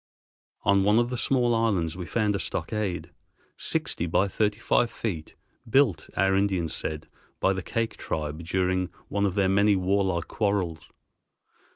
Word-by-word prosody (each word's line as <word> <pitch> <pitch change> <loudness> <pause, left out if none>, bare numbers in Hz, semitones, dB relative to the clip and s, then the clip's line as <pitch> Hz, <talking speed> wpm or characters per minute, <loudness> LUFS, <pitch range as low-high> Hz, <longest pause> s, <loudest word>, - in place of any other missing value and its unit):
On 100 -1 +4
one 105 +2 +4
of 120 +1 +2
the - - -1
small 120 -1 +2
islands 100 -8 +1
we 90 -2 -6
found 105 -3 +1
a - - -1
stockade, 90 -6 -3 0.4
sixty 85 - -2
by 95 +4 +2
thirty 105 +1 0
five 120 +1 +2
feet, 85 -11 -5 0.3
built, 110 - +3
our 95 +1 +3
Indians 95 -5 +1
said, 75 -1 -4 0.3
by 95 - +3
the 95 - -3
Kake 115 +5 -2
tribe 75 +1 -4
during 95 +1 0 0.2
one 100 0 +1
of 95 - -3
their 100 -2 +3
many 100 +2 +4
warlike 95 -2 +1
quarrels. 100 -7 -1
95 Hz, 155 wpm, -26 LUFS, 90-105 Hz, 0.4 s, On